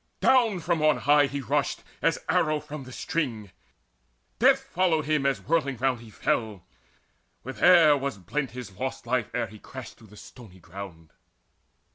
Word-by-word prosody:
Down 230 -7 +3
from 170 -1 0
on 155 0 +4
high 145 0 +4
he 140 0 -4
rushed 125 - -1 0.2
As - - +2
arrow 155 0 +2
from 150 -2 -9
the 130 - -11
string: 120 - -3 0.9
death - - +4
followed 170 -4 0
him 150 -2 +1
As 135 - 0
whirling 140 -5 0
round 130 0 0
he 115 - -13
fell; 105 -3 -2 0.8
with 130 +2 -8
air 170 -4 +7
was 140 -5 -3
blent 135 - -3
His 125 -2 -8
lost 130 -1 -4
life, 125 -2 -1
ere 125 - 0
he 110 - -13
crashed 130 +2 -10
to 110 - -16
the 105 +1 -16
stony 105 -7 -14
ground. 85 -1 -10
130 Hz, 165 wpm, -26 LUFS, 110-150 Hz, 0.9 s, air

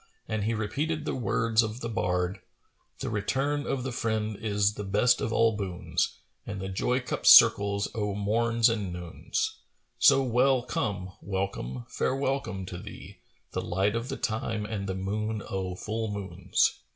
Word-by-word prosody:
And 110 -2 -1
he 115 +1 0
repeated 150 +9 -2
the - - -1
words 115 -1 +2
of 110 +2 -4
the 115 - -2
bard, 90 -4 -1 0.6
"The - - -2
return 135 +8 -1
of 130 -2 -1
the 130 - -3
friend 110 -2 -1
is 105 -1 +1
the 105 - -5
best 105 +6 +3
of - - -1
all 115 -1 +3
boons, 95 -4 -2
* - - -35
And 105 -2 -4
the 95 0 -4
joy 125 +7 0
cup 125 - -4
circles 100 0 +7
o' 105 -2 -2
morns 115 +3 +2
and 105 -5 -1
noons: 90 - -3 0.4
So 135 - +6
well 130 +1 +3
come, 100 -6 -2
welcome, 95 -11 -3
fair 130 - -1
welcome 135 -8 -2
to 90 -1 -7
thee, - - -10 0.2
* - - -41
The - - -2
light 95 +4 0
of 115 +2 -3
the - - -3
time 110 -1 -2
and 100 -3 -4
the 95 - -2
moon 105 +3 -2
o' 95 -2 -3
full 110 +4 -3
moons." 100 -2 0
105 Hz, 175 wpm, -28 LUFS, 100-115 Hz, 0.6 s, circles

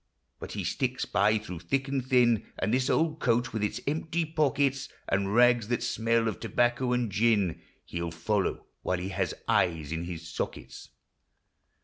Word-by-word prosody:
But - - -7
he - - -3
sticks - - -1
by 105 +3 +3
through 90 -5 -6
thick 135 - -1
and 135 -1 -1
thin; 120 -4 +3
And 105 - 0
this 130 +1 +2
old 160 -1 +1
coat, 120 0 +1
with 110 - -2
its 105 +3 -1
empty 160 +3 -1
pockets, 140 -3 +1 0.2
And 100 +1 0
rags 120 -2 +5
that 120 0 -1
smell 115 0 +1
of 110 - -3
tobacco 120 +1 +1
and 125 -3 0
gin, 105 -4 +2 0.2
He 85 - -5
'11 85 -1 -4
follow 100 +4 0 0.2
while 90 - 0
he 90 +2 -4
has 95 - -2
eyes 80 -4 +1
in 80 +1 -3
his 85 -1 -6
sockets. 85 - -6
115 Hz, 170 wpm, -29 LUFS, 95-130 Hz, 0.2 s, rags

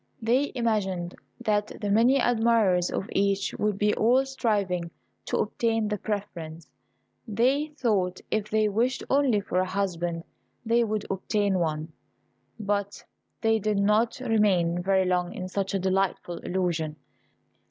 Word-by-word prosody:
They 250 +5 +1
imagined 195 -7 -1 0.3
that 210 -2 +1
the 205 -1 -2
many 235 +6 +5
admirers 225 -7 +3
of 195 - -3
each 195 0 +1
would 210 -2 0
be 210 +1 +2
all 250 +5 +3
striving 205 -10 -1 0.4
to - - 0
obtain 225 -2 0
the 210 -1 -2
preference. 170 -7 -5 0.6
They 255 +7 +2
thought 190 -8 0
if 215 -1 -1
they 215 0 +2
wished 235 +5 0
only 265 -6 +3
for 185 -2 -1
a 185 - +1
husband 175 -4 -2 0.4
they 235 +1 +3
would 215 -2 -2
obtain 195 0 0
one; 155 -1 -2 0.7
but 200 -1 -2 0.4
they 225 0 +3
did 210 0 0
not 215 +5 +2
remain 195 -8 +2
very 190 +1 +2
long 180 -1 0
in 185 - -4
such 195 +1 -2
a - - +1
delightful 190 -2 -1
illusion. 170 -4 -2
205 Hz, 140 wpm, -27 LUFS, 185-225 Hz, 0.7 s, many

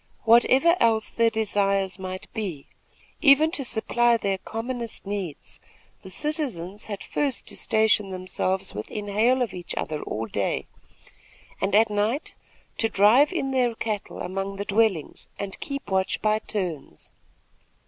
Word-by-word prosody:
Whatever 255 +8 +5
else 225 -1 +2
their 230 0 +3
desires 200 -3 0
might 185 0 -5
be, 190 - -4 0.6
even 305 +1 +6
to 285 - -1
supply 240 0 +2
their 195 -3 -1
commonest 235 +1 -5
needs, 195 -6 -5 0.4
the 190 - -10
citizens 210 - -3
had 205 -2 -6
first 280 -4 -1
to - - -5
station 215 -2 +2
themselves 185 0 -2
within 205 - -5
hail 240 +5 +3
of 220 -6 -4
each 180 -1 -6
other 155 -1 -3
all 110 +1 -3
day, 100 -3 -2 1.0
and 195 +1 +1
at 220 0 +5
night 215 +8 -1 0.5
to 225 - +2
drive 225 - +5
in 270 -7 -2
their 250 -3 +1
cattle 215 -3 -4
among 195 +2 -3
the 200 +1 -4
dwellings 205 -7 0
and 200 -1 -5
keep 275 -7 -6
watch 190 0 +1
by 215 +1 +2
turns. 175 - -5
210 Hz, 140 wpm, -25 LUFS, 190-235 Hz, 1.0 s, even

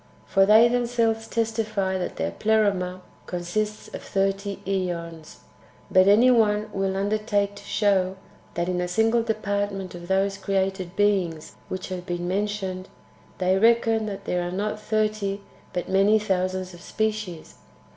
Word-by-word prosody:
For 195 -1 +3
they 220 +3 +7
themselves 235 -2 0
testify 215 -4 -1
that 180 - -4
their 80 +1 -2
Pleroma 195 - +1 0.3
consists 210 +5 -3
of - - -7
thirty 195 0 -1
^ons; 170 -4 -3 0.6
but 185 0 +5
any 230 +5 +6
one 215 -2 +2
will 195 0 -1
undertake 205 0 0
to 200 - -11
show 195 -3 +1 0.4
that, 170 0 -1
in 180 -1 -1
a 180 - -1
single 225 +5 +2
department 205 -4 -2
of 175 0 -9
those 195 +1 +1
[created 190 -2 -1
beings] 185 -6 0 0.2
which 185 0 -5
have 180 -1 -6
been 175 0 -3
mentioned, 190 -1 -2 0.5
they 185 +1 +2
reckon 225 0 +3
that 200 -2 -6
there 180 - 0
are 175 - -3
not 210 +3 -2
thirty, 215 -2 -1 0.3
but 180 - -3
many 195 +3 +4
thousands 185 -2 -1
of 175 - -13
species. 215 -7 -3
195 Hz, 145 wpm, -25 LUFS, 185-215 Hz, 0.6 s, they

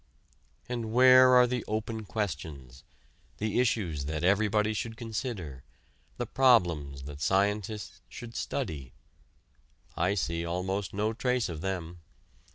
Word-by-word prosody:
And 120 -3 -4
where 130 +1 +7
are 125 0 +7
the 125 -1 -2
open 110 0 -3
questions: 75 - -5 0.5
the 110 +2 -1
issues 95 - 0
that 80 +2 -3
everybody 105 +3 +2
should 115 +1 -4
consider, 105 - -5 0.5
the 120 - -2
problems 85 - +2
that 70 +1 -9
scientists 100 +4 0
should 115 - -9
study? 70 -6 -4 1.0
I 90 +4 +1
see 85 -3 -1
almost 90 +3 -2
no 105 +3 -1
trace 125 -1 0
of 80 -3 -6
them. 90 -2 -4
100 Hz, 120 wpm, -29 LUFS, 85-115 Hz, 1.0 s, where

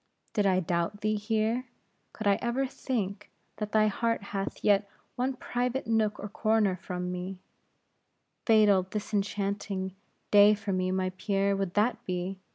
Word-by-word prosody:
Did 205 -2 +2
I 185 -1 +3
doubt 170 +4 -1
thee 215 0 +1
here; 220 +3 0 0.5
could 215 - -7
I 200 -1 +4
ever 245 +3 0
think, 210 -6 -3 0.3
that 210 -1 -4
thy 215 0 +4
heart 230 +1 0
hath 195 0 -3
yet 200 -1 +3 0.3
one 255 +2 0
private 250 +1 -2
nook 220 -2 +1
or 205 - -4
corner 215 -2 +2
from 180 0 -4
me; 180 +1 -5 1.1
fatal 210 -4 +6
disenchanting 200 -1 -2 0.4
day 205 +1 +8
for 205 -1 -3
me, 185 0 0
my 185 0 0
Pierre, 200 -1 +1
would 195 -2 -2
that 215 +4 +2
be. 185 +1 -3
205 Hz, 150 wpm, -29 LUFS, 190-220 Hz, 1.1 s, day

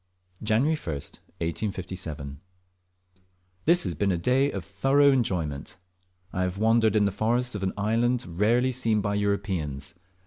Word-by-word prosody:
Jan. 110 +3 +2
1st, 90 - -2 0.3
1857. 85 -6 -4 1.3
This 170 +2 +4
has 90 - -1
been 100 +5 0
a 90 - +1
day 130 +10 +2
of - - -5
thorough 140 +1 +4
enjoyment. 90 - -1 0.6
I 90 - -1
have 90 +1 -1
wandered 110 0 +3
in 105 -1 +4
the 100 - +1
forests 120 +5 0
of 105 - -4
an 95 -1 -1
island 115 +4 +1
rarely 110 +9 +2
seen 115 -4 +1
by 100 +1 -1
Europeans. 95 -9 -2
105 Hz, 140 wpm, -26 LUFS, 90-120 Hz, 1.3 s, This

